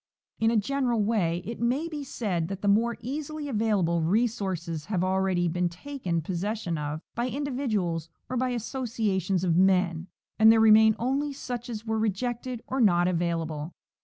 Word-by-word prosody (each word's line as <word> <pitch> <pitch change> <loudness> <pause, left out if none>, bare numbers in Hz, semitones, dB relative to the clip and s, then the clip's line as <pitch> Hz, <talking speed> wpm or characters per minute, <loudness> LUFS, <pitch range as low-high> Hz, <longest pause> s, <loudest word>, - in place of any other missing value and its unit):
In 225 - +3
a 230 - +2
general 240 0 +1
way 180 -6 0
it 230 +2 -6
may 255 +8 0
be 305 -3 -5
said 190 -11 -2
that 195 +1 -6
the - - +1
more 225 +4 +3
easily 295 +4 -4
available 205 -9 +1
resources 185 -5 -1
have 185 -4 -1
already 185 -1 +1
been 175 +1 0
taken 180 - -4
possession 185 +1 -2
of 150 0 -4
by 240 +2 -1
individuals 225 - -2 0.2
or 255 - -4
by 255 0 0
associa 230 -4 -1
tions 185 0 0
of 170 -3 +2
men, 180 -2 +2 0.3
and 220 0 +8
there 225 - +5
remain 220 0 +7
only 275 +4 -1
such 245 -3 -6
as 225 -1 -6
were 220 0 -1
rejected 240 +3 -2
or 265 0 -1
not 175 -5 +4
available. 165 -3 -2
215 Hz, 165 wpm, -27 LUFS, 175-240 Hz, 0.3 s, and